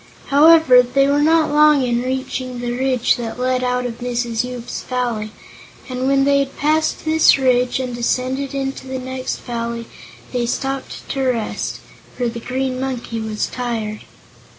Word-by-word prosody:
However, 300 -3 +7
they 250 +3 +2
were 285 +1 +2
not 320 +1 +3
very - - -3
long 300 -2 +5
in 240 -1 0
reaching 255 0 -3
the 240 0 -3
ridge 255 -1 +1
that 235 0 -5
led 255 0 0
out 250 0 0
of 235 -1 -5
Mrs. 240 -1 -1
Yoop's 250 -1 -6
Valley, 240 -4 -2 0.6
and 255 0 -2
when 275 0 +3
they 280 0 +3
had 275 -1 -3
passed 310 +2 +1
this 315 -1 +5
ridge 250 -1 +2
and 255 -2 -3
descended 255 +3 -1
into 270 -1 -4
the 260 0 -4
next 255 0 -4
valley 235 -1 -4 0.5
they 240 -1 0
stopped 270 +2 -4
to 270 - -2
rest, 250 -4 -2 0.4
for 245 - 0
the 235 0 -4
Green 255 +2 -2
Monkey 250 -3 -3
was 220 -1 -2
tired. 225 -4 -4
255 Hz, 165 wpm, -19 LUFS, 240-270 Hz, 0.6 s, However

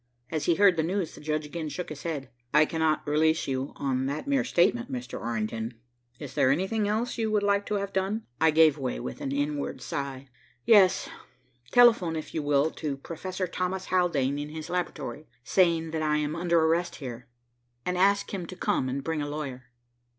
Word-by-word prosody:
As 155 -2 -1
he 170 - +3
heard 195 -2 +5
the - - +3
news, 175 +1 -1
the - - -12
judge 155 0 -1
again 155 +1 -5
shook 175 +5 -5
his 155 -2 -7
head. 145 -6 -4 0.2
"I 150 +1 +7
cannot 160 -1 0
release 160 +2 +2
you 130 0 -2
on 130 -1 -1
that 145 +2 -3
mere 280 -1 +2
statement, 235 +9 +2
Mr. 250 -1 -5
Orrington. 115 0 -3 0.4
Is 140 -3 -8
there 130 - +3
anything 190 +9 +1
else 225 +4 -1
you 220 -1 +1
would 210 -1 +1
like 200 0 +2
to 210 - -1
have 200 -1 -3
done?" 195 +4 -1 0.2
I 160 - +6
gave 155 -1 +5
way 130 - -2
with 65 +1 -6
an 135 - -3
inward 145 +1 -2
sigh. 140 -1 -5 0.4
"Yes, 200 -5 +5 0.6
telephone, 230 -9 +5
if 155 - -6
you 160 - -1
will, 145 +1 +2
to 145 -4 -4
Professor 185 +6 -4
Thomas 185 +1 -3
Haldane 145 -7 +2
at 145 0 -4
his 155 +1 -7
laboratory, 155 -5 -3 0.2
saying 165 -1 +2
that 160 -1 -2
I 150 -1 +2
am 150 +1 -1
under 170 0 +2
arrest 165 +2 +1
here, 125 -4 -7 0.6
and 180 - -1
ask 200 +3 +2
him 180 -4 -4
to 185 - -8
come 130 -7 0
and 135 +2 -3
bring 160 0 -2
a 145 - -3
lawyer." 140 -4 -5
160 Hz, 195 wpm, -28 LUFS, 140-185 Hz, 0.6 s, I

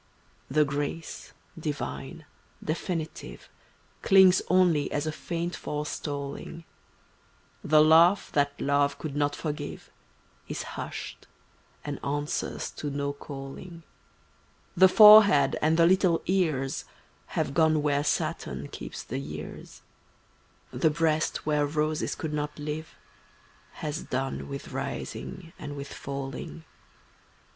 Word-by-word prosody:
The 150 +3 +3
grace, 145 +3 -4 0.3
divine, 150 0 -5 0.4
definitive, 165 0 -4 0.5
Clings 190 -1 +6
only 175 -5 +3
as 145 +1 -1
a 155 - -1
faint 170 +2 -4
forestalling; 150 +2 -5 1.0
The 155 0 +5
laugh 165 +5 +5
that 145 -1 0
love 140 0 +1
could 150 -3 -6
not 145 0 +1
forgive 150 -2 -5 0.6
Is - - -4
hushed, - - -7 0.6
and 145 -1 -5
answers 145 +1 -2
to 150 - -3
no 140 0 -2
calling; 145 +5 -9 0.9
The 190 +2 +7
forehead 210 -9 +8
and 160 +2 +3
the 170 - +6
little 180 -1 +3
ears 155 -8 0 0.5
Have - - 0
gone 155 -1 +3
where 145 -1 +1
Saturn - - -2
keeps - - -7
the - - -4
years; 75 +2 -8 0.9
The 160 - +2
breast 155 0 0
where 150 -1 +2
roses 155 +1 -1
could 155 -2 -4
not 150 0 -3
live 150 +1 -5 0.8
Has 150 +2 -4
done 135 +2 -3
with 140 0 -6
rising 140 +5 -6
and 145 -1 -6
with 140 0 -7
falling. 135 - -6
150 Hz, 110 wpm, -27 LUFS, 140-165 Hz, 1.0 s, forehead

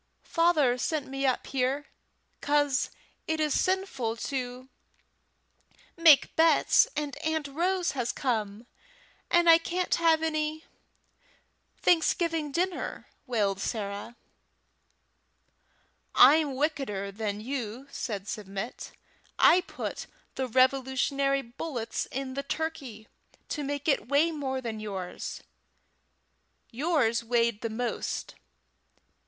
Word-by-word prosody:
"Father 310 -8 +3
sent 305 +1 -1
me 270 0 -1
up 255 - 0
here 270 +2 -1 0.6
'cause 290 -2 +2 0.4
it 320 0 -1
is 305 -2 +1
sinful 370 - 0
to 255 0 -4 1.3
make 325 -4 +6
bets, 325 +8 +5
and 295 -1 -3
Aunt 315 -2 -2
Rose 355 +5 0
has 245 -3 -2
come, 220 -4 -2 0.6
and 345 0 +4
I 330 0 +8
can't 360 +2 -2
have 325 -1 +3
any 310 0 -2 1.1
Thanksgiving 330 -3 +2
dinner," 355 +4 -2 0.2
wailed 205 -5 0
Sarah. 205 +1 -4 2.0
"I'm 300 -3 +6
wickeder 260 -9 -2
than 205 0 -3
you," 245 +1 -5
said 205 -7 -4
Submit. 200 +3 -6 0.4
"I 365 - +6
put - - -5 0.3
the 260 -1 -2
Revolutionary 270 +2 +2
bullets 240 -1 -4
in 265 0 -5
the 275 - -2
turkey 280 -7 -5 0.4
to 295 - -3
make 285 +1 -4
it 275 -7 +2
weigh 295 +4 +3
more 265 -4 -3
than 225 -3 -5
yours. 195 -4 -6 1.3
Yours 250 -4 +1
weighed 230 -2 +1
the 230 - -2
most. 240 +2 -3
275 Hz, 105 wpm, -28 LUFS, 235-315 Hz, 2.0 s, I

